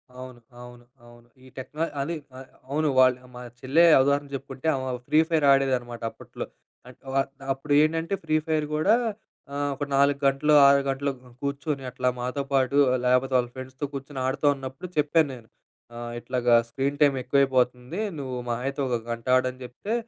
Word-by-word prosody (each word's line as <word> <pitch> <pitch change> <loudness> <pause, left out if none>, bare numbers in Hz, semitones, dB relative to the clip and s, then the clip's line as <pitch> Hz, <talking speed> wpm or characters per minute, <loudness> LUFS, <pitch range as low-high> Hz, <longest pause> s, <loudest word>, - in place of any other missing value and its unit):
అవును, 130 -1 -10 0.2
అవును, 120 0 -13 0.2
అవును. 120 0 -17 0.2
ఈ - - -15
టెక్న 140 +4 -9 0.2
అదే 165 +5 -2 0.2
ఆహ్, 130 0 -11 0.2
అవును. 150 +2 +1
వాళ్ళు 130 0 +3
మా 125 - -8 0.2
చెల్లె 140 +6 +3 0.2
ఉదాహరణ 140 +1 +1
చెప్పుకుంటే 135 +1 -6
ఆమె 130 -1 -3 0.2
ఫ్రీ 155 - +4
ఫైర్ 160 -3 +2
ఆడేదన్నమాట 130 -3 +1
అప్పట్లో. - - -8 0.4
అ-అంటే 135 +2 -4
అప్పుడు 135 +2 -3
ఏంటంటే 165 +3 0
ఫ్రీ 155 -1 0
ఫైర్ 155 -2 0
కూడా, 155 +7 +3 0.6
ఆ - - -4 0.2
ఒక 140 - -4
4 140 0 +3
గంటలు, 140 +3 +2
6 140 0 +5
గంటలు 140 +1 -1 0.3
కూర్చొని 140 0 -3
అట్లా 125 0 0
మాతో 125 +3 -2
పాటు 135 +1 +2 0.3
లేకపోతే 125 +1 +2
వాళ్ళ 120 -1 0
ఫ్రెండ్స్‌తో 130 +2 -6
కూర్చొని 135 0 -6
ఆడుతూ 130 +3 -2
ఉన్నప్పుడు 135 +6 -8
చెప్పాన్నేను. 145 -6 +1 0.5
ఆ - - -8 0.2
ఇట్లాగా 120 -1 +2
స్క్రీన్ 140 +3 -2
టైమ్ 145 -2 +5
ఎక్కువైపోతుంది. 130 +2 +1 0.2
నువ్వు 130 -2 -4
మహా 120 0 -2
అయితే 135 +1 -4
1 125 - 0
గంటాడని 130 +2 0
చెప్తే 125 - -6
135 Hz, 155 wpm, -25 LUFS, 125-145 Hz, 0.6 s, 6